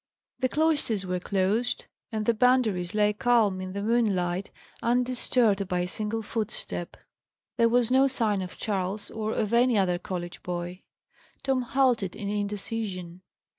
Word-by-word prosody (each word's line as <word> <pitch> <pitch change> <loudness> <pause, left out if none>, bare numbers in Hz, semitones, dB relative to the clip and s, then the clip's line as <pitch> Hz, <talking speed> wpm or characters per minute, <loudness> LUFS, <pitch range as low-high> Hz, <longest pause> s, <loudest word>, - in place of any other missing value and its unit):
The 255 - +1
cloisters 290 -10 +2
were 180 0 -1
closed, 200 +6 0 0.3
and 215 -1 -2
the 235 - +4
Boundaries 220 -7 +2
lay 210 0 +3
calm 210 -4 +2
in 185 0 -6
the 200 0 -3
moonlight, 200 -5 +1 0.3
undisturbed 240 -4 +2
by 180 -1 0
a 180 - -1
single 215 +4 -2
footstep. 210 -5 -4 0.6
There 230 -1 +4
was 245 0 +2
no 265 +1 +5
sign 220 -6 +1
of 180 -1 -7
Charles, 200 -1 -2
or 220 -1 -3
of 215 0 -1
any 240 -1 +4
other 180 -3 +2
college 175 -2 -5
boy. 175 +1 -5 0.6
Tom 265 -2 +1
halted 245 -6 +1
in 200 -1 -4
indecision. 205 -3 -3
210 Hz, 145 wpm, -27 LUFS, 185-240 Hz, 0.6 s, no